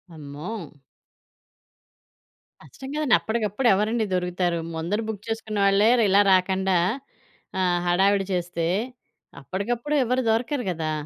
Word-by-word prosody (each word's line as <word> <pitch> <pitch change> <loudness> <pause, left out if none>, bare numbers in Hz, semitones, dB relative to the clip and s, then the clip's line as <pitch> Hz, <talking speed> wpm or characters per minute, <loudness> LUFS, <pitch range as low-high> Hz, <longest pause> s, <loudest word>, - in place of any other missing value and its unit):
అమ్మో! 150 +7 -7 2.1
కష్టం 265 0 -11
కదండీ. 300 -6 +1
అప్పడికప్పుడు 220 +2 -1
ఎవరండి 215 +3 0
దొరుకుతారు? 180 -1 -1 0.2
ముందర 175 +7 -2
బుక్ 215 -2 -5
చేసుకున్నవాళ్ళే 210 -1 +2
ఇలా 200 0 +5
రాకండా 190 0 +2 0.8
ఆహ్, 180 -1 +2
హడావిడి 195 +3 +3
చేస్తే, 175 -2 -2 0.7
అప్పడికప్పుడు 235 - -3
ఎవరు 250 +2 0
దొరకరు 245 +4 0
గదా! 160 -2 -3
200 Hz, 100 wpm, -24 LUFS, 180-225 Hz, 2.1 s, ఇలా